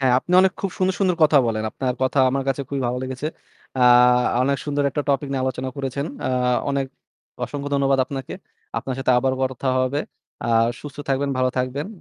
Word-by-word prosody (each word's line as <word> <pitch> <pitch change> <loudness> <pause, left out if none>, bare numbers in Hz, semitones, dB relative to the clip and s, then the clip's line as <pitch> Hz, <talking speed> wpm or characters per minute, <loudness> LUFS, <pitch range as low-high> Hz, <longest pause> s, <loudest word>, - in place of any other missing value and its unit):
হ্যাঁ, 130 -2 +3
আপনি 175 - -6
অনেক 190 -1 +3
খুব 195 - -2
সুন্দর, 190 0 +1
সুন্দর 185 -3 +2
কথা 150 -1 +6
বলেন। 110 -1 -1
আপনার 125 +1 -2
কথা 130 +2 +1
আমার 135 +1 -1
কাছে 135 +1 0
খুবই 140 -1 -2
ভালো 125 +1 -1
লেগেছে। 130 +2 -4 0.5
আ - - 0 0.6
আ - - +2
অনেক 140 +1 +1
সুন্দর 145 -1 -1
একটা 145 - -2
topic 140 0 +1
নিয়ে 130 -1 -1
আলোচনা 130 0 -2
করেছেন। 140 +1 -3 0.2
আ - - 0 0.4
অনেক 140 -1 0 0.6
অসংখ্য 145 -1 -5
ধন্যবাদ 135 -1 +2
আপনাকে। 135 -2 -6 0.4
আপনার 130 +2 -4
সাথে 130 -1 +1
আবারও 130 +1 0
কথা 130 0 -2
হবে। 130 +3 0 0.4
আ - - -1 0.3
সুস্থ 145 -2 -9
থাকবেন, 140 +1 0
ভালো 130 0 +2
থাকবেন। 130 +4 -2
135 Hz, 195 wpm, -22 LUFS, 130-145 Hz, 0.6 s, কথা